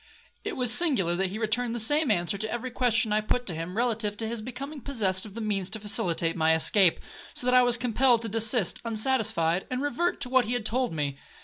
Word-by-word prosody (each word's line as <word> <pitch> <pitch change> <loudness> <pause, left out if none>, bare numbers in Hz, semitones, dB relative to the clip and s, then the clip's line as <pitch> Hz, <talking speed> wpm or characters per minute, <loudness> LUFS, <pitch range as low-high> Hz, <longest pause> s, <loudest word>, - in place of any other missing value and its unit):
It - - -4
was 245 -3 +3
singular 245 - +3
that 190 +2 -1
he 200 - -6
returned 230 +2 -1
the - - -3
same 295 +6 +3
answer 180 -1 0
to 215 +2 -4
every 240 +2 -4
question 230 -3 +2
I 215 - +2
put 245 +3 -1
to 180 - -5
him, 165 +5 -6
relative 225 -3 -1
to 225 - -3
his 230 0 -2
becoming 275 +5 -7
possessed 210 -8 -1
of 200 - -14
the 230 - -5
means 200 -3 -2
to 220 +2 -3
facilitate 175 -5 0
my 160 -1 +3
escape, 180 +2 +3 0.4
so - - -4
that 250 - +2
I 250 - +7
was 245 -1 +3
compelled 245 0 +2
to - - -4
desist 225 -2 0
unsatisfied, 220 -7 0
and 255 - -2
revert 315 +6 -1
to 250 - -3
what 260 -1 +3
he 235 - -2
had 245 -3 -2
told 250 +3 -1
me. 145 -3 -3
225 Hz, 230 wpm, -27 LUFS, 195-250 Hz, 0.4 s, I